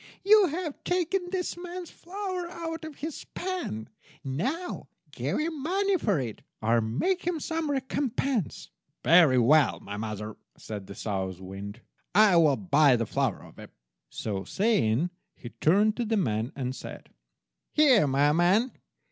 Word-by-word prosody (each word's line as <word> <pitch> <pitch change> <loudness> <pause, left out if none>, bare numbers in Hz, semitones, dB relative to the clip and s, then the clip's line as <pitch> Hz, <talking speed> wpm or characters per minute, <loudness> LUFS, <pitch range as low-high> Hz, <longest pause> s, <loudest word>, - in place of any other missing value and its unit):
You 415 -1 +6
have 325 -1 -5
taken 360 +1 0
this 365 -1 -2
man's 350 0 -7
flour 370 -1 -5
out 330 -1 -5
of 315 -2 -8
his 310 +2 -6
pan. 355 - -4 0.4
Now 255 - -3 0.2
give - - -2
him 310 -2 -2
money 390 +6 +1
for 205 - +1
it, 115 -5 -5 0.2
or 115 +2 +2
make 130 - 0
him 350 -3 0
some 320 0 -2
recompense." 265 - -2 0.3
"Very 165 -6 +6
well, 140 +4 +4
mother," 105 +1 -6 0.2
said 105 -3 -7
the 100 - -9
South 95 -3 -3
wind, 100 +4 -8 0.3
"I 210 -3 +6
will 155 -5 +5
buy 150 -7 +4
the 115 -1 0
flour 130 -2 -1
of - - -15
him." - - -10 0.4
So 100 -3 -4
saying, 180 - +1 0.2
he 120 - -9
turned 205 - +3
to 240 - -1
the 220 0 0
man, 115 - 0
and 130 -2 -3
said— - - -9 0.6
"Here, 265 - +5
my 140 +2 +3
man. 185 - +3
200 Hz, 150 wpm, -28 LUFS, -, 0.6 s, You